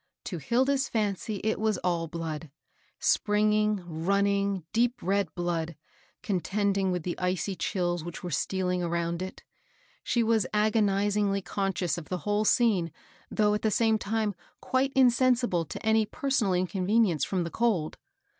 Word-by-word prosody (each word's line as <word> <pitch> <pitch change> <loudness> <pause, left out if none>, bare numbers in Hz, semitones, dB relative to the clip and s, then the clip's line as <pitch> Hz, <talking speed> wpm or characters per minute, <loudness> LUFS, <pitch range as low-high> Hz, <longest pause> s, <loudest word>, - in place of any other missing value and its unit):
To 175 - -5
Hilda's 265 - +1
fancy 210 -1 -1
it 220 +1 0
was 215 -2 +1
all 170 -2 0
blood, 160 -1 -5 0.3
— - - -36
springing, 210 -1 +2
running, 200 +3 0
deep 240 +2 +2
red 195 -2 0
blood, 170 -2 -2 0.5
contending 195 0 0
with 180 -2 -2
the 175 - -2
icy 185 +1 -1
chills 175 -3 -1
which 170 -1 -7
were 175 - -4
stealing 180 +4 -1
around 170 0 -1
it. 185 0 -7 0.6
She 235 - +1
was 225 -2 +2
agonizingly 205 -2 +2
con 195 -1 -1
scious 175 -2 -1
of 155 - -12
the 185 - -1
whole 210 +1 +1
scene, 205 -9 +3 0.4
though 210 -1 +2
at 210 - -1
the 220 - +2
same 220 0 +2
time 215 0 -1 0.3
quite 260 +1 0
insensible 245 -7 +3
to 155 - -8
any 220 -1 +3
personal 260 -11 0
inconvenience 185 0 +1
from 185 -3 0
the 170 - -5
cold. 210 -10 0
200 Hz, 150 wpm, -28 LUFS, 175-220 Hz, 0.6 s, scene